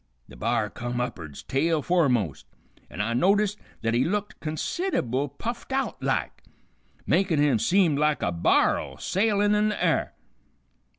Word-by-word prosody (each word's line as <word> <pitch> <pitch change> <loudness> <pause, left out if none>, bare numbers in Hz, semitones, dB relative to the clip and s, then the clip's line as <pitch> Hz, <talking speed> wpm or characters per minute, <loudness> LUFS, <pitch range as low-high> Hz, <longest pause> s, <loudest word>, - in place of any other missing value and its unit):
The - - -14
b'ar 115 -2 -1
come 120 0 -4
up'ards 85 - -5
tail 155 +2 0
foremost, 125 - +1 0.4
an' 105 - -5
I 115 +3 -1
noticed 200 - +2 0.2
th't 115 0 +1
he 120 +2 +3
looked 205 +3 -2
consid'able 155 - -2
puffed 235 +3 -5
out 270 0 -2
like, - - -2 0.6
makin' 185 -5 +2
him 145 -6 +3
seem 170 - +3
lik' 150 +1 +1
a - - +1
bar'l 85 -1 +1
sailin' 205 +1 +1
in 210 0 +2
the 210 - -3
air. - - 0
150 Hz, 140 wpm, -26 LUFS, -, 0.6 s, he